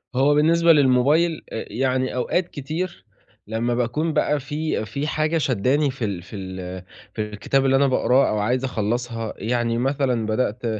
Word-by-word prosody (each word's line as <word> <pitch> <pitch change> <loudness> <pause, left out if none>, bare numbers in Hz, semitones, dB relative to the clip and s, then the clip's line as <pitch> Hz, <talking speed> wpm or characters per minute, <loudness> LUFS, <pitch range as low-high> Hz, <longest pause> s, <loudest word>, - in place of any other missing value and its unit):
هو 140 +3 +4
بالنسبة 165 +2 +5
للموبايل 145 +4 +3
إ 110 - -4
يعني 130 +2 0
أوقات 170 +8 0
كتير 165 +5 -5 0.4
لمّا 115 +3 -1
باكون 125 +7 -1
بقى 150 0 +1
في 150 -2 -3
في 140 +7 -4
حاجة 155 +1 0
شدّاني 135 +1 +1
في 130 -3 -4
ال 100 -4 -3
في 95 - -11
ال 95 -1 -6 0.3
في 110 - -3
الكتاب 105 +6 -1
اللي 135 0 +4
أنا 140 +1 +4
باقراه 130 +1 +3
أو 105 - 0
عايز 125 +5 0
أخلصها 115 -1 -2
يعني 115 0 -1
مثلًا 130 -3 0
بدأت 110 +1 -1
130 Hz, 160 wpm, -23 LUFS, 115-145 Hz, 0.4 s, بالنسبة